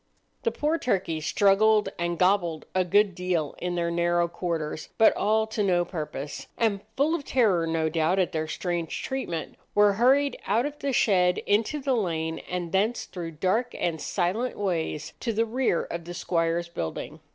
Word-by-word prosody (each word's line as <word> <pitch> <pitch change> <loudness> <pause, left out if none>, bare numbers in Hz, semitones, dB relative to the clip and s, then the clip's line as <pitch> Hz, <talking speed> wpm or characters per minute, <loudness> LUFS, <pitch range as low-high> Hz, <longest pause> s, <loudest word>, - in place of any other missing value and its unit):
The 465 - +1
poor 315 -1 0
turkeys 170 -9 -1
struggled 210 +2 +4
and 170 0 -1
"gobbled" 180 -4 +2
a 185 - +3
good 200 +2 +3
deal 175 -4 -1
in 180 0 -2
their 170 -1 0
narrow 175 0 +2
quarters, 165 -3 -4
but 220 - +6
all 220 +2 +2
to 220 0 -3
no 180 -3 +2
purpose; 150 -4 -6
and 210 -4 +1 0.2
full 295 +4 +3
of 335 -4 -1
terror, 205 -12 +2
no 160 -1 0
doubt, 160 +3 +1
at 185 -1 +1
their 160 -2 -2
strange 170 0 -3
treatment, 220 -12 -4 0.2
were 205 0 +5
hurried 270 +6 +3
out 220 +6 +2
of 295 0 -5
the 280 - -1
shed 180 -7 +3
into 220 +9 +1
the 270 -1 0
lane, 165 -7 -1
and 180 -2 -3
thence 210 +5 +1
through 170 -3 -7
dark 190 +10 0
and 160 -3 -1
silent 205 +7 -1
ways 165 -6 -2
to 235 - -1
the 225 +2 +2
rear 235 -6 0
of 170 -1 -6
the 175 0 -7
squire's 170 -1 0
building. 85 - -5
180 Hz, 175 wpm, -26 LUFS, 170-220 Hz, 0.2 s, but